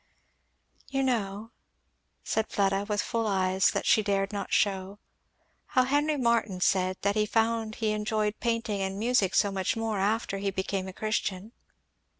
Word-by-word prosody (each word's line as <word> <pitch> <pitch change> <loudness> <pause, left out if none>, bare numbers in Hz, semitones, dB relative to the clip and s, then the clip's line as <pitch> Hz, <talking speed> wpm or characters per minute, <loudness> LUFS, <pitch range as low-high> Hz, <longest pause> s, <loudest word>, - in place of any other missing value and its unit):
"You 270 0 0
know," 220 -3 -2 0.7
said 220 0 -1
Fleda 195 0 +1
with 205 -1 0
full 230 -2 -1
eyes 190 -1 +2
that - - -2
she 215 - +5
dared 200 0 0
not 200 - -4
shew, 195 -1 0 0.7
"how 255 -2 +3
Henry 290 +3 +1
Martyn 235 -6 +1
said 185 0 +1
that 200 0 +2
he 210 0 +1
found 225 0 0
he 220 -2 0
enjoyed 215 0 -1
painting 230 -3 -1
and 190 0 -2
music 220 -4 +1
so 200 - +3
much 190 +3 -1
more 225 -2 -1
after 200 0 0
he 200 0 -1
became 190 0 -3
a - - -5
Christian." 215 -1 -2
210 Hz, 155 wpm, -28 LUFS, 195-225 Hz, 0.7 s, she